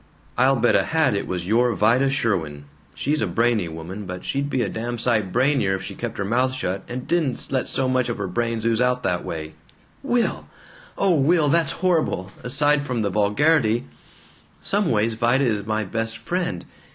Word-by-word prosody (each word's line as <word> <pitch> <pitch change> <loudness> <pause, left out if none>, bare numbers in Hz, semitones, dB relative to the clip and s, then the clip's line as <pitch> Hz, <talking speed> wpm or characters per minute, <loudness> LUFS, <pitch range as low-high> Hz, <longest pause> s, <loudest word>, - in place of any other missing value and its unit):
"I'll 130 +2 +4
bet 120 -1 +2
a - - +5
hat 160 -6 +1
it 100 - -2
was 90 -2 -3
your 115 +3 +2
Vida 120 +7 +3
Sherwin. 85 - -1 0.3
She's 150 +2 -1
a - - +1
brainy 115 -5 +1
woman, 85 +5 -7
but 90 0 -6
she'd 140 +1 -1
be 130 -3 0
a - - -1
damn 120 +3 -4
sight 110 -5 0
brainier 125 -5 +2
if 95 - -6
she - - -6
kept - - -5
her 95 - -2
mouth 125 +5 +1
shut 95 -6 -2
and 125 +1 -5
didn't 160 -7 -1
let 130 -2 0
so 130 - -1
much 130 -1 +1
of 120 - -3
her 100 - -3
brains 115 +4 -2
ooze 115 0 +2
out 125 0 +1
that 90 -1 0
way." 80 -1 -6 0.5
"Will! 240 -1 0 0.5
O 195 -2 +3
Will! 155 +1 +3
That's 165 -1 +2
horrible! 155 - +1
Aside 145 +3 +2
from 125 -5 -2
the 100 - -1
vulgarity 115 - +2 0.7
Some 200 -1 0
ways, 110 0 +2
Vida 120 +4 +2
is 105 -4 -1
my 110 0 0
best 115 +3 -3
friend. 115 - -3
120 Hz, 190 wpm, -23 LUFS, 105-135 Hz, 0.7 s, a